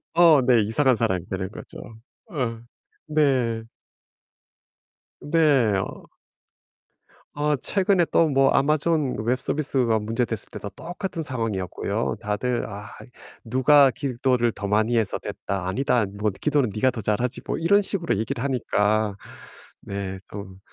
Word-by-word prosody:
어 165 Hz, -5 st, +7 dB
네. 120 Hz, -3 st, +5 dB
이상한 125 Hz, +4 st, +2 dB
사람이 95 Hz, -6 st, -1 dB
되는 95 Hz, 0 st, -3 dB
거죠. -, -, -11 dB, 0.5 s
응. 120 Hz, -5 st, -3 dB, 0.4 s
네. 130 Hz, -7 st, +1 dB, 1.6 s
네. 145 Hz, -9 st, +3 dB
어. -, -, -6 dB, 1.3 s
어 150 Hz, 0 st, +1 dB
최근에 185 Hz, +5 st, +1 dB
또 165 Hz, -, +4 dB
뭐 135 Hz, -1 st, +4 dB
Amazon 150 Hz, -1 st, +1 dB
웹 125 Hz, +2 st, +1 dB
서비스가 130 Hz, -6 st, 0 dB
문제 115 Hz, +3 st, -1 dB
됐을 110 Hz, -3 st, -5 dB
때도 100 Hz, -, -7 dB
똑같은 175 Hz, 0 st, -5 dB
상황이었고요. 115 Hz, -, -2 dB
다들 110 Hz, +4 st, -1 dB
"아 105 Hz, 0 st, -8 dB, 0.5 s
누가 130 Hz, +4 st, +5 dB
기도를 125 Hz, -2 st, 0 dB
더 100 Hz, -, -5 dB
많이 110 Hz, +3 st, +2 dB
해서 110 Hz, -3 st, 0 dB
됐다." 95 Hz, -2 st, -4 dB
"아니다. 125 Hz, +2 st, +1 dB
뭐 100 Hz, +1 st, -2 dB
기도는 145 Hz, +3 st, 0 dB
네가 120 Hz, +5 st, +2 dB
더 110 Hz, -, -6 dB
잘하지." 110 Hz, +5 st, -1 dB
뭐 -, -, -2 dB
이런 200 Hz, +5 st, +4 dB
식으로 180 Hz, -, -1 dB
얘기를 115 Hz, +4 st, -3 dB
하니까. 110 Hz, -5 st, +1 dB, 0.7 s
네. 100 Hz, -1 st, -5 dB
좀 95 Hz, -2 st, -8 dB
120 Hz, 260 characters per minute, -24 LUFS, 105-145 Hz, 1.6 s, 어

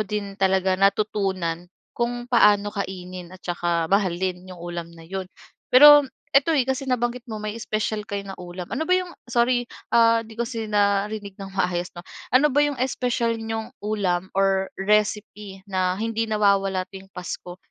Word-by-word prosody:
din 205 Hz, 0 st, -4 dB
talaga 190 Hz, 0 st, +2 dB
natutunan 195 Hz, -4 st, 0 dB, 0.2 s
kung 240 Hz, 0 st, -2 dB
paano 210 Hz, -4 st, +4 dB
kainin 185 Hz, -2 st, -6 dB
at -, -, -25 dB
tsaka 175 Hz, -1 st, 0 dB
mahalin 185 Hz, -1 st, 0 dB
yung 180 Hz, -2 st, -10 dB
ulam 170 Hz, -1 st, -5 dB
na 165 Hz, -, -13 dB
yun. 190 Hz, +3 st, -4 dB, 0.5 s
Pero 290 Hz, +2 st, +9 dB, 0.3 s
ito, 285 Hz, +4 st, +4 dB
eh, 265 Hz, -4 st, +2 dB
kasi 265 Hz, +1 st, -1 dB
nabanggit 245 Hz, -1 st, -1 dB
mo 215 Hz, -, -5 dB
may 215 Hz, +1 st, -4 dB
special 215 Hz, -2 st, -2 dB
kayo 200 Hz, 0 st, -4 dB
na 195 Hz, -, -7 dB
ulam 180 Hz, 0 st, -8 dB
ano 315 Hz, +4 st, -2 dB
ba 365 Hz, -, 0 dB
yung 365 Hz, 0 st, +2 dB, 0.2 s
sorry, 245 Hz, 0 st, +1 dB, 0.2 s
ah, 230 Hz, -1 st, +5 dB
'di 225 Hz, 0 st, -12 dB
ko 235 Hz, -, 0 dB
kasi 225 Hz, -2 st, -5 dB
narinig 205 Hz, 0 st, 0 dB
ng 195 Hz, -, -6 dB
maayos, 180 Hz, -1 st, 0 dB
'no, 175 Hz, -, -8 dB, 0.2 s
ano 275 Hz, +3 st, +4 dB
ba 290 Hz, -, +3 dB
yung 290 Hz, -1 st, +1 dB
special 245 Hz, -3 st, 0 dB
niyong 225 Hz, +2 st, -4 dB
ulam 190 Hz, -4 st, -1 dB
or 195 Hz, -1 st, +2 dB
recipe 210 Hz, -1 st, -1 dB
na 185 Hz, -2 st, 0 dB
hindi 225 Hz, +1 st, -2 dB
nawawala 195 Hz, -3 st, +2 dB
tuwing 195 Hz, 0 st, -10 dB
pasko? 180 Hz, -1 st, -7 dB
205 Hz, 165 wpm, -24 LUFS, 185-230 Hz, 0.5 s, Pero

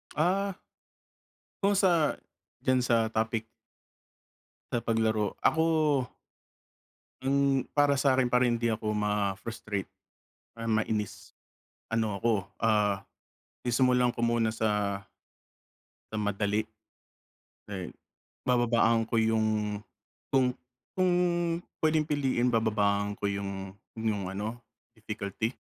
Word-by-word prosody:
Ah. 190 Hz, +4 st, +1 dB, 1.0 s
Kung 200 Hz, +1 st, +4 dB
sa 175 Hz, -6 st, +3 dB, 0.5 s
diyan 130 Hz, 0 st, +3 dB
sa 115 Hz, -2 st, +2 dB
topic 110 Hz, 0 st, 0 dB, 1.3 s
sa 120 Hz, -, -1 dB
paglaro, 110 Hz, -2 st, +1 dB
ako 160 Hz, +1 st, +3 dB, 1.6 s
Hmm, 135 Hz, -1 st, +2 dB
para 145 Hz, -2 st, +4 dB
sa'kin 130 Hz, -3 st, +3 dB
para 125 Hz, 0 st, +4 dB
hindi 115 Hz, -1 st, +1 dB
ako 105 Hz, -1 st, -1 dB
ma-frustrate 105 Hz, 0 st, -2 dB, 0.7 s
or 115 Hz, -, -4 dB
mainis, 110 Hz, -2 st, -1 dB, 0.6 s
ano 110 Hz, -2 st, 0 dB
ako, 115 Hz, -1 st, +3 dB, 0.3 s
ah, 105 Hz, -3 st, +2 dB, 0.6 s
sisumulan 125 Hz, 0 st, +3 dB
ko 120 Hz, -, -5 dB
muna 115 Hz, -1 st, +2 dB
sa 105 Hz, -3 st, 0 dB, 1.1 s
sa 110 Hz, -, -3 dB
madali. 105 Hz, +1 st, 0 dB, 1.0 s
Eh, 95 Hz, -3 st, -5 dB, 0.6 s
bababaan 115 Hz, -2 st, +3 dB
ko 115 Hz, -, +2 dB
yung 110 Hz, -2 st, +1 dB, 0.5 s
kung 130 Hz, -2 st, +3 dB, 0.4 s
kung 185 Hz, -1 st, +3 dB, 0.7 s
pwedeng 155 Hz, -1 st, +3 dB
piliin, 135 Hz, -4 st, +1 dB
bababaan 105 Hz, -2 st, +1 dB
ko -, -, -2 dB
yung 100 Hz, -1 st, -4 dB, 0.2 s
yung 105 Hz, -4 st, -1 dB
ano, 110 Hz, +5 st, -4 dB, 0.3 s
difficulty. 110 Hz, +1 st, -3 dB
115 Hz, 95 wpm, -29 LUFS, 105-125 Hz, 1.6 s, Kung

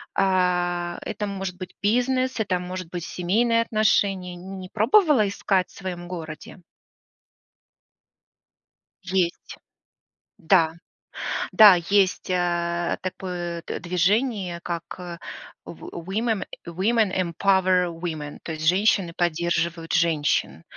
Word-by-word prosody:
А, 180 Hz, -2 st, +1 dB
это 210 Hz, -, -4 dB
может 195 Hz, -2 st, -4 dB
быть 185 Hz, 0 st, -8 dB
бизнес, 250 Hz, +3 st, +1 dB
это 190 Hz, -4 st, 0 dB
может 180 Hz, 0 st, -6 dB
быть 175 Hz, -2 st, -5 dB
семейные 230 Hz, +8 st, +1 dB
отношения. 200 Hz, -5 st, +1 dB
Не 190 Hz, +2 st, -9 dB
не 185 Hz, -1 st, -8 dB
пробовала 240 Hz, -, +4 dB
искать 195 Hz, -1 st, 0 dB
в -, -, -21 dB
своем 180 Hz, -2 st, -6 dB
городе? 160 Hz, -1 st, -8 dB, 2.4 s
Есть. 185 Hz, -2 st, -1 dB, 0.8 s
Да. 160 Hz, -3 st, +3 dB, 0.8 s
Да, 210 Hz, -3 st, +9 dB
есть, 190 Hz, +3 st, +1 dB
э, 175 Hz, -1 st, 0 dB
такое 175 Hz, -2 st, -4 dB
д -, -, -4 dB
движение, 180 Hz, +1 st, 0 dB
как, 170 Hz, -2 st, -3 dB
э, 175 Hz, -2 st, -7 dB, 0.5 s
в -, -, -10 dB
Wo 170 Hz, -, -8 dB
women 220 Hz, +2 st, -1 dB, 0.2 s
Women 195 Hz, +4 st, +1 dB
Empower 185 Hz, 0 st, +2 dB
Women, 160 Hz, -3 st, -5 dB
то 160 Hz, -, -5 dB
есть 155 Hz, 0 st, -5 dB
"Женщины 190 Hz, 0 st, +3 dB
поддерживают 170 Hz, -1 st, -1 dB
женщин". 160 Hz, -3 st, +1 dB
180 Hz, 110 wpm, -24 LUFS, 175-200 Hz, 2.4 s, Да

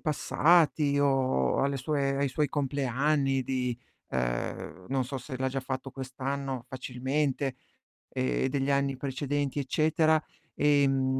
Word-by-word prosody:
passati, 155 Hz, -2 st, +3 dB
o 135 Hz, -, +2 dB
alle 140 Hz, 0 st, +1 dB
sue 135 Hz, 0 st, 0 dB
ai 140 Hz, 0 st, +1 dB
suoi 150 Hz, +2 st, 0 dB
compleanni 135 Hz, 0 st, +1 dB
di 125 Hz, -2 st, -1 dB, 0.3 s
ehm, 65 Hz, +8 st, -3 dB
non 135 Hz, -1 st, 0 dB
so 135 Hz, +2 st, -5 dB
se 130 Hz, -1 st, -7 dB
l'ha 130 Hz, 0 st, +1 dB
già 135 Hz, +1 st, -2 dB
fatto 130 Hz, 0 st, -4 dB
quest'anno 135 Hz, -1 st, -4 dB
facilmente, 130 Hz, +2 st, -1 dB, 0.5 s
e 65 Hz, -, 0 dB
degli 135 Hz, +1 st, 0 dB
anni 140 Hz, -1 st, +1 dB
precedenti 140 Hz, +1 st, -2 dB
eccetera, 155 Hz, +3 st, +2 dB, 0.3 s
ehm, 135 Hz, -2 st, +3 dB
135 Hz, 125 wpm, -29 LUFS, 130-145 Hz, 0.5 s, passati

